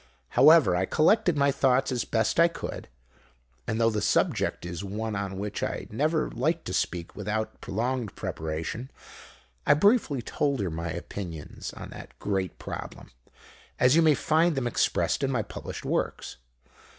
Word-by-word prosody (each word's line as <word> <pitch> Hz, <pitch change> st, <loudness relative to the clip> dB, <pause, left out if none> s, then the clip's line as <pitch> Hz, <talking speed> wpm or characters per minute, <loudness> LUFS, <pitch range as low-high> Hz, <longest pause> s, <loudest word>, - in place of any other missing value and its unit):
However, 155 Hz, -, +6 dB
I 90 Hz, +1 st, +1 dB
collected 175 Hz, -, +3 dB
my 140 Hz, 0 st, +4 dB
thoughts 135 Hz, -1 st, +2 dB
as 125 Hz, -2 st, -1 dB
best 110 Hz, +5 st, 0 dB
I 170 Hz, -, +7 dB
could, 170 Hz, -, -6 dB, 0.8 s
and, 110 Hz, -, -1 dB
though 115 Hz, 0 st, +4 dB
the 105 Hz, -1 st, -1 dB
subject 105 Hz, -, +1 dB
is 85 Hz, +1 st, -5 dB
one 105 Hz, +2 st, -3 dB
on 100 Hz, -1 st, -3 dB
which 105 Hz, +1 st, -4 dB
I -, -, -3 dB
never 155 Hz, +7 st, 0 dB
like 165 Hz, +1 st, 0 dB
to 90 Hz, -, -5 dB
speak 90 Hz, -2 st, -2 dB
without 105 Hz, +1 st, -3 dB
prolonged 120 Hz, +1 st, -2 dB
preparation, 80 Hz, +11 st, -4 dB, 0.7 s
I -, -, +5 dB
briefly 160 Hz, -, +3 dB
told 140 Hz, +1 st, -1 dB
her 95 Hz, -4 st, -1 dB
my 85 Hz, +1 st, -4 dB
opinions 85 Hz, -1 st, -6 dB
on -, -, -9 dB
that -, -, -11 dB
great 95 Hz, -3 st, -2 dB
problem, -, -, -8 dB, 0.7 s
as 125 Hz, +3 st, +5 dB
you 165 Hz, -, +6 dB
may 155 Hz, -2 st, +5 dB
find 160 Hz, +3 st, +2 dB
them 135 Hz, -2 st, -1 dB
expressed 120 Hz, -, +1 dB
in 135 Hz, -, +1 dB
my 125 Hz, -5 st, 0 dB
published -, -, -8 dB
works. -, -, -2 dB
115 Hz, 160 wpm, -27 LUFS, 95-145 Hz, 0.8 s, I